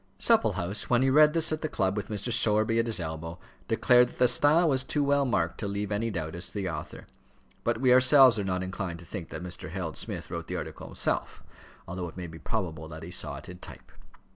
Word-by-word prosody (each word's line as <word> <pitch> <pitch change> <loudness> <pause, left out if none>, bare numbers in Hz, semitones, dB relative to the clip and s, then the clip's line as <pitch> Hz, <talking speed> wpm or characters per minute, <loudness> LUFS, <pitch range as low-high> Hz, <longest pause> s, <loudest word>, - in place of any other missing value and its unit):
Supplehouse, 95 +5 +2
when 120 +1 +3
he 135 - +3
read 150 +2 +6
this 165 -1 +2
at 155 - -2
the 155 - -2
club 95 -7 0
with 105 -1 -4
Mr. 110 +2 -3
Sowerby 110 -1 +3
at 115 - 0
his 115 - 0
elbow, 80 +1 -6 0.3
declared 125 0 +4
that - - -16
the 125 - +4
style 155 +7 +4
was 130 -3 +2
too 145 +2 -1
well 140 0 +2
marked 85 -8 -1
to 105 - -3
leave 100 +1 -3
any 110 +3 -1
doubt 80 -7 -4
as 85 +2 -4
to - - -11
the 100 -2 -2
author; 75 -3 -7 0.6
but 115 -1 0
we 130 -1 +4
ourselves 130 -2 +6
are - - -1
not 90 -1 -2
inclined 95 -2 -5
to 85 - -13
think 85 -1 -7
that - - -7
Mr. 90 -3 -6
Harold 85 -2 -5
Smith - - -5
wrote 85 -1 -5
the - - -4
article - - -7
himself, - - -2 0.4
although 90 0 -5
it 80 - -15
may 90 - -5
be 80 -1 -10
probable 80 -8 -4
that 80 0 -9
he 85 - -8
saw - - -3
it - - -10
in 90 0 -10
type. - - -12
100 Hz, 240 wpm, -28 LUFS, 85-125 Hz, 0.6 s, read